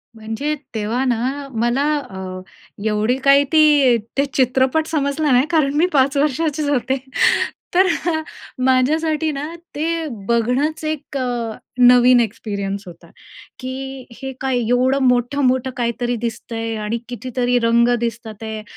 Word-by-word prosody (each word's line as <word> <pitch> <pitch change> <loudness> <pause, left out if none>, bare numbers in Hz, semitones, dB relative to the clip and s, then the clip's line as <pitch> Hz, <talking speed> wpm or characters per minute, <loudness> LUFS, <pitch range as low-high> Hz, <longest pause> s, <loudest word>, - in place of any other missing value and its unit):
म्हणजे 225 +8 -3 0.2
तेव्हा 225 +4 -1
ना 260 +4 -1
मला 240 +4 +1 0.3
अ, 190 -1 -7 0.5
एवढी 215 +4 +1
काही 280 +1 +6
ती 295 -6 +5 0.2
ते 280 - +3
चित्रपट 260 +4 +2
समजला 295 -1 0
नाही 250 +3 +4
कारण 300 -4 +2
मी 340 - +4
पाच 275 +1 +3
वर्षाचीच 300 +1 0
होते, 260 -1 0 0.8
तर 375 +1 +5 0.8
माझ्यासाठी 310 +5 +2
ना 280 0 -4 0.3
ते 325 +2 -1 0.2
बघणंच 250 +7 0
एक 305 -2 -4 0.6
नवीन 245 0 +6
एक्सपिरियन्स 200 -3 -3
होता. 170 -1 -13 0.5
की 265 0 -6 0.2
हे 265 0 -4
काय 265 -2 0
एवढं 250 +4 +2
मोठं-मोठं 255 +1 +1
काहीतरी 240 0 -1
दिसतंय 225 0 -4
आणि 225 +2 -1
कितीतरी 245 0 -1
रंग 235 +1 +4
दिसतात 230 -2 -5
आहे 220 -1 -5
255 Hz, 120 wpm, -20 LUFS, 235-285 Hz, 0.8 s, काही